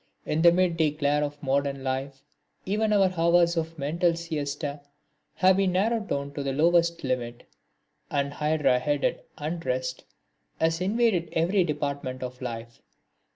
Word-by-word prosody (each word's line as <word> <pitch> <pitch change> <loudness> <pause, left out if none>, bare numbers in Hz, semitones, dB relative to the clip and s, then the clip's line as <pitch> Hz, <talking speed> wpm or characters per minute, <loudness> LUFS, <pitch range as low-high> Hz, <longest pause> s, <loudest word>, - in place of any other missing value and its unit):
In 155 - 0
the 170 0 +8
midday 170 -3 +2
glare 145 0 0
of 145 0 -5
modern 140 0 0
life 135 +1 -3 0.4
even 215 +3 0
our 195 -3 +3
hours 170 +1 +3
of 165 0 -3
mental 165 +4 +1
siesta 145 -3 -4 0.5
have 190 0 +4
been 195 -2 +2
narrowed 215 +3 +1
down 140 0 -3
to 145 - -4
the 140 -1 -2
lowest 170 +3 +2
limit, 120 -2 -3 0.7
and 140 0 -1
hydra 150 -4 +2
headed 145 +1 0 0.2
unrest 130 -5 -3 0.5
has 165 +1 +1
invaded 200 -3 +1
every 180 +4 +2
department 140 -4 -3
of 125 0 -7
life. 115 -1 -6
150 Hz, 140 wpm, -26 LUFS, 140-170 Hz, 0.7 s, the